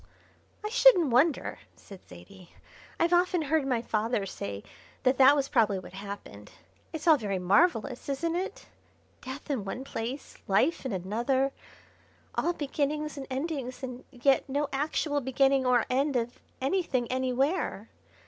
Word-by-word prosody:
"I - - -1
shouldn't 440 - +5
wonder," 275 +6 +2 0.2
said 195 -2 -13
Zaidie; 90 - -14 0.4
"I've 335 +1 +2
often 355 -1 +3
heard 300 -1 +1
my 240 -3 0
father 215 -2 -1
say 100 - -6 0.4
that 255 +1 +2
that 270 +2 +8
was 275 -2 0
probably 220 -8 +2
what 185 - -9
happened. 195 - -9 0.4
It's 315 -2 -6
all 315 -2 +7
very 205 -6 -2
marvellous, 220 - +2
isn't 330 +5 -1
it? 370 +2 -4 0.6
death 265 +3 -7
in 255 -7 -1
one 200 +7 -5
place, 255 +1 -6
life 265 - +2
in - - -4
another, 235 +9 0 0.8
all 345 - 0
beginnings 300 0 -2
and 275 -2 -7
endings, 270 -2 -4
and 250 -1 -6
yet 270 +2 +1
no 285 +2 -1
actual 290 +1 0
beginning 270 0 +2
or 245 -2 +3
end 275 +2 +1
of 240 0 -2 0.2
anything 270 -4 0
anywhere. 260 - 0
265 Hz, 145 wpm, -28 LUFS, 230-295 Hz, 0.8 s, that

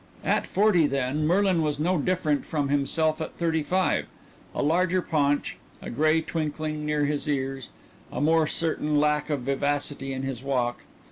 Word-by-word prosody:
At - - +1
forty, 190 -6 +3
then, 140 +2 -1
Merlin 185 0 +3
was 150 -2 0
no 175 +3 +1
different 155 -3 0
from 145 -3 -2
himself 155 +3 +1
at 160 - -5
thirty 165 -2 +1
five; 185 +4 0 0.5
a - - 0
larger 180 +4 +2
paunch, 145 -4 0 0.2
a - - -7
gray 155 +5 +3
twinkling 155 -1 -3
near 150 -1 +1
his 150 +1 -2
ears, 135 -3 -2 0.4
a - - -4
more 160 +1 +3
certain 155 -2 0
lack 150 0 +1
of 145 -3 -1
vivacity 140 +1 -1
in 130 0 -4
his 135 -3 -4
walk. 125 -3 -1
150 Hz, 160 wpm, -26 LUFS, 140-160 Hz, 0.5 s, forty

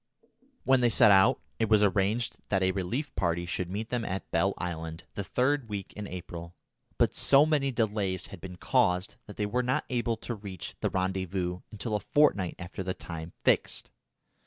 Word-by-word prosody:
When 130 -1 +4
they 120 - +4
set 115 -2 +6
out, 95 -1 +5 0.2
it 110 -2 +1
was 105 -1 +5
arranged 105 +4 +1
that 95 -2 +2
a 95 - +3
relief 120 - -3
party 85 -1 0
should 85 +1 -3
meet 105 +4 -4
them 120 -2 -1
at 95 -2 -4
Bell 90 +4 +2
Island 80 -1 -5
the 100 - -3
third 130 +3 0
week 100 -2 -5
in 105 -1 -6
April, 85 -1 -8 0.4
but - - +3
so 140 +2 +6
many 145 -3 +1
delays 105 -5 -1
had 90 - -9
been 90 -1 -7
caused 90 -3 +1
that 105 - -10
they 105 - 0
were 125 +5 0
not 125 +1 0
able 120 -2 0
to 120 - -5
reach 100 -5 -7
the - - 0
rendezvous 95 -1 -2
until 110 +1 -3
a - - +1
fortnight 100 - +2
after 90 +1 -7
the 95 0 -3
time 80 0 -7
fixed. - - +1
100 Hz, 185 wpm, -29 LUFS, 90-115 Hz, 0.4 s, set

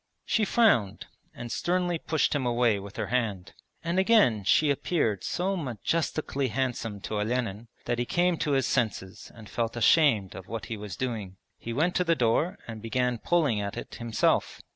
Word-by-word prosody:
She 220 - +1
frowned, 195 - +2 0.3
and 120 -1 -8
sternly 175 -1 0
pushed 160 0 0
him 145 -3 0
away 120 -3 +2
with 100 0 -10
her - - -1
hand. 105 -7 -1 0.3
And 170 +2 0
again 190 - +4
she 145 +9 +4
appeared 130 - 0
so 190 +2 -1
majestically 140 - -2
handsome 115 -4 -3
to 105 +1 -3
Olenin 115 -1 -2 0.2
that 120 0 -1
he 120 - 0
came 175 +5 +1
to 150 -3 -1
his 135 -1 +2
senses 105 -6 -2
and 110 -2 -12
felt 115 +1 -3
ashamed 115 - +4
of 95 - -9
what 115 0 -5
he 115 - -4
was 105 -3 -7
doing. 105 -5 -4 0.2
He 115 - -6
went 160 +9 +1
to 180 - +2
the 165 -1 +2
door 150 - +1
and 110 -2 -7
began 125 +1 -1
pulling 145 -11 +1
at 100 0 -5
it - - -7
himself. 115 -2 +1
120 Hz, 180 wpm, -27 LUFS, 110-160 Hz, 0.3 s, again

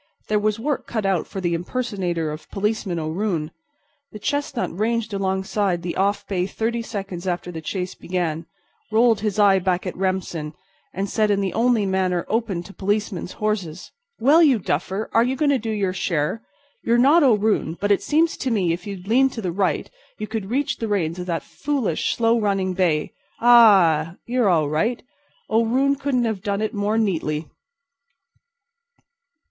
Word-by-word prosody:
There 210 0 +2
was 215 0 0
work 280 +5 -2
cut 220 -4 -2
out 190 -4 0
for 195 - -6
the 175 -2 0
impersonator 175 -4 -2
of 155 +1 -9
Policeman 205 -3 -2
O'Roon. 165 0 -2 0.6
The - - -8
chestnut 285 -2 -2
ranged 225 +2 -1
alongside 190 -1 -1
the 175 - -3
off 200 +1 0
bay 185 -2 -1
thirty 230 +3 -2
seconds 195 -5 -6
after 175 0 -2
the 160 -2 -6
chase 180 +2 -4
began, 170 -3 -3 0.4
rolled 225 0 +4
his 210 -1 -2
eye 200 -2 +5
back 185 0 -1
at 185 - -4
Remsen, 180 -5 -2 0.4
and 195 +2 -3
said 215 +1 +1
in 200 -1 +2
the 195 -2 -1
only 230 -2 +2
manner 185 -2 0
open 215 -6 -1
to 195 - -12
policemen's 205 -2 -2
horses: 195 -6 -3 0.3
"Well, 285 +8 +5
you 285 -7 +5
duffer, 190 +3 -2
are 230 - +5
you 255 +2 0
going 285 +1 +2
to 270 - +2
do 225 - -5
your 200 -4 -1
share? 175 +2 -1 0.4
You're 235 +1 +2
not 285 +8 +5
O'Roon, 210 - +2
but 205 0 0
it 200 - +3
seems 320 +2 +1
to 265 - -2
me 190 -8 +1
if 175 +3 -6
you'd 195 -2 -7
lean 260 +5 +4
to 245 - -7
the 180 -4 -2
right 190 +2 0 0.3
you 215 - -4
could 215 -3 -5
reach 275 +4 0
the 225 - -3
reins 180 -5 -1
of 180 - -5
that 170 -2 -2
foolish 265 - -1
slow 230 0 +2
running 195 -3 0
bay—ah! 180 0 +4
you're 240 -3 +1
all 160 -4 +3
right; 215 +12 -1 0.4
O'Roon 250 +5 +2
couldn't 275 -3 0
have 220 -4 -2
done 200 +1 -2
it 215 - -2
more 205 +2 0
neatly!" 165 -7 -1
200 Hz, 175 wpm, -22 LUFS, 180-225 Hz, 0.6 s, eye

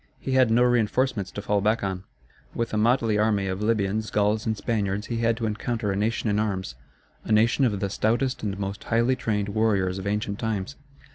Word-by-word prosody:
He 135 - -4
had 130 -2 +4
no 120 +2 +4
reinforcements 120 -2 +1
to 100 - -7
fall 105 -1 +1
back 110 +2 +1
on. 95 -1 -3 0.5
With 115 -1 -2
a - - +1
motley 115 -1 +2
army 105 -2 +2
of 95 +1 -3
Libyans, 110 0 0
Gauls, 105 +1 +1
and 110 -1 0
Spaniards 105 -2 -1
he - - -1
had 115 0 +1
to 115 - -2
encounter 110 0 -2
a - - -1
nation 110 +3 -1
in 105 0 +1
arms 95 - -2 0.5
a - - -5
nation 115 +5 +4
of 105 -5 0
the 100 - -1
stoutest 120 +5 0
and 100 -3 -3
most 100 0 -5
highly 115 +3 +2
trained 105 -5 -1
warriors 100 -3 +1
of 95 - -5
ancient 105 0 -2
times. 110 +2 -3
110 Hz, 205 wpm, -25 LUFS, 100-115 Hz, 0.5 s, had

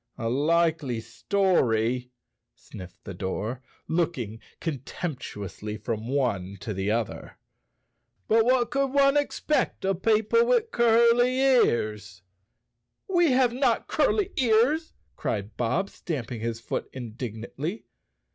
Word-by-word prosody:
"A 115 -2 -2
likely 150 -2 +1
story," 125 - +1 0.5
sniffed 90 -1 -12
the 95 - -7
door, 105 +7 -4 0.3
looking 160 -10 -1 0.2
contemptu¬ 135 - -5
ously 105 +3 -6
from 110 +1 -4
one 100 -8 -1
to 110 - -4
the 95 +1 -2
other. 110 0 -3 0.9
"But 225 +1 +4
what 245 0 +2
could 275 0 +1
one 275 +1 +4
ex¬ 290 0 -1
pect 290 -9 0
of 190 -1 0
people 225 - +3
with 470 -2 +2
curly 235 +2 +4
ears." 105 - +2 0.8
"We 345 -7 +3
have 250 -2 +3
not 260 +2 +1
curly 400 -2 +1
ears," 260 +6 +2 0.2
cried 105 +1 -3
Bob, 125 +11 -1
stamping 125 -8 -5
his 115 0 -3
foot 115 - -4
indignantly. 125 - -6
150 Hz, 120 wpm, -26 LUFS, -, 0.9 s, But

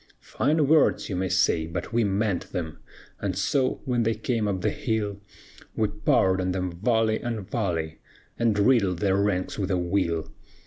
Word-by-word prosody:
"Fine 150 +2 +2
words, 155 -4 +3
you 95 - -2
may 95 +1 -1
say, 85 -4 +2
but 90 +7 -5
we 120 0 +3
meant 100 -1 -1
them; 80 -3 -4 0.4
And - - -2
so 130 -2 0
when 125 -3 +1
they 115 0 +1
came 110 -1 -1
up 95 -2 -1
the - - +1
hill, 105 -3 -2 0.5
We 110 -2 +1
poured 95 -2 +2
on 90 0 -1
them 90 -1 -2
volley 110 +4 +1
on 115 -5 -3
volley, 85 -8 -2 0.4
And 115 -3 +1
riddled 100 -5 +3
their 95 +2 +1
ranks 100 -1 -1
with 95 -1 -1
a 95 - +1
will. 85 -2 -1
100 Hz, 175 wpm, -26 LUFS, 90-115 Hz, 0.5 s, words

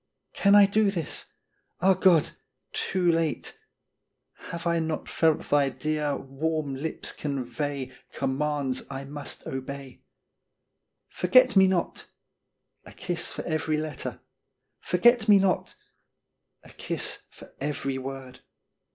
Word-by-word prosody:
Can 200 0 +4
I 205 -1 +9
do 205 +1 +2
this! 170 -6 -3 0.5
Ah, 190 +2 +5
God! 180 -4 +4 0.4
too 180 -2 +1
late 165 -2 -1 0.9
Have 170 0 -6
I 170 0 +2
not 160 -1 -3
felt 160 -2 +1
thy 145 -1 +3
dear, 150 0 -2
warm 145 +1 -3
lips 145 +4 -4
convey 140 0 -4 0.2
Commands 140 -1 -1
I 135 0 -5
must 145 +1 -6
obey? 135 0 -7 0.5
" - - -54
Forget 255 +7 +5
me 190 -1 +7
not! 185 -2 -1 0.4
" - - -53
a - - -13
kiss 175 -1 -2
for - - -5
every 155 -1 -1
letter. 155 -3 -5 0.3
" - - -53
Forget 225 +5 +4
me 205 - +9
not! 190 -1 0 0.5
" - - -52
a - - -15
kiss - - -2
for - - -15
every 140 -2 -2
word. 130 -1 -7
155 Hz, 130 wpm, -27 LUFS, 140-180 Hz, 0.9 s, I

